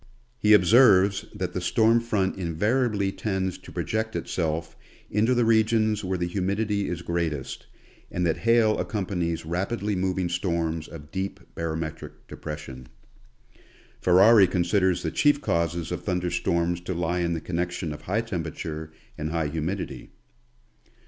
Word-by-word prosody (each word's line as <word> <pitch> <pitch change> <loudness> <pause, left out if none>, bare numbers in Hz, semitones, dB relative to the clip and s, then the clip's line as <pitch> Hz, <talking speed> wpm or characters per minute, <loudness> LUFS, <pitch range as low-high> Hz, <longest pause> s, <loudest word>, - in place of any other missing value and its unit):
He 105 -2 +5
observes 100 -1 +5
that 90 -1 -4
the 90 - -2
storm 115 +5 +3
front 105 -5 0
invariably 100 +4 0
tends 95 -3 -2
to - - -13
project 110 +6 -2
itself 80 -1 -2 0.4
into 110 +5 +2
the 120 -1 +3
re 110 -1 +5
gions 110 -1 +1
where 95 0 -1
the 85 - -1
humidity 100 +3 -1
is 85 -1 -4
greatest, 80 -5 -3 0.4
and 90 - -1
that 80 - +1
hail 115 -1 +3
accompanies 90 -6 -2
rapidly 100 +5 -2
moving 95 -1 0
storms 85 -2 -1
of 75 -2 -11
deep 95 0 -3
barometric 80 -1 -5
depression. 70 -5 -8 1.1
Ferari 95 +3 +6
considers 90 0 +1
the 80 - -1
chief 145 -1 +3
causes 85 - -1
of 90 - -3
thunder 90 -2 -1
storms 85 -1 0
to 90 +1 -4
lie 85 +1 -1
in 85 -1 0
the 80 - -2
connec 85 +2 -2
tion 85 -3 -4
of 75 - -9
high 105 +5 -1
temperature 80 -6 -5 0.3
and 75 +1 -2
high 80 -2 -1
humidity. 80 +5 -4
90 Hz, 145 wpm, -26 LUFS, 85-105 Hz, 1.1 s, Ferari